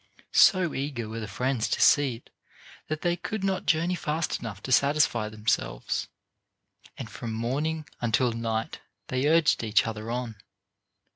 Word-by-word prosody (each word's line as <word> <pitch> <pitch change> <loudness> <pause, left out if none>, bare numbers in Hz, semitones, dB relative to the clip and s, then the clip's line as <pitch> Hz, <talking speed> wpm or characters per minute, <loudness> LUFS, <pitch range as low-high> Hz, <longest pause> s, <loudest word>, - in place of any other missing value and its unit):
So 185 -5 +5
eager 135 -5 -3
were 110 +1 -5
the 110 - -5
friends 125 +3 -1
to - - 0
see 140 -4 +4
it 115 - -17 0.6
that 155 0 -3
they 175 -1 +1
could 185 +4 -5
not 195 -1 -1
journey 165 +3 +2
fast 160 -2 -2
enough 105 -3 -7
to 130 - -5
satisfy 135 -5 +3
themselves, 105 - -1 0.9
and - - -6
from 115 - -6
morning 145 +8 -2
until 120 +1 +2
night 115 -1 -3 0.3
they 130 +2 0
urged 160 -5 +3
each 110 0 +3
other 110 0 -5
on. 120 -2 -3
125 Hz, 150 wpm, -27 LUFS, 115-155 Hz, 0.9 s, So